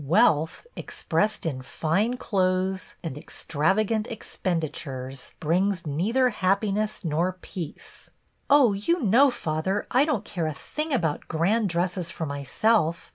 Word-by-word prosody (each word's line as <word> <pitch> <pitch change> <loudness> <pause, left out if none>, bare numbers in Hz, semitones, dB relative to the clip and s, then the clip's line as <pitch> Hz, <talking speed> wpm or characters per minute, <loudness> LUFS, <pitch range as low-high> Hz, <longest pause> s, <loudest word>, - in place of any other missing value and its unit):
Wealth, 160 - +3
expressed 215 -2 -1
in 135 -5 -2
fine 195 - 0
clothes 185 -3 0
and 160 -6 -4
extrav 155 +5 -1
agant 215 0 0
expenditures, 150 - -4
brings 180 +3 +1
neither 215 - +2
happiness 205 +1 0
nor 170 +4 +1
peace." 180 -3 -9 0.4
"Oh, 275 -6 +6
you 275 - 0
know, 240 +7 +6
father, 190 -1 -2
I 260 +3 +5
don't 305 -2 -1
care 170 -4 -2
a 155 - -3
thing 305 - -4
about 165 - 0
grand 195 +7 +1
dresses 175 0 -1
for 160 - -4
myself. 160 - +1
185 Hz, 130 wpm, -26 LUFS, 160-215 Hz, 0.4 s, Oh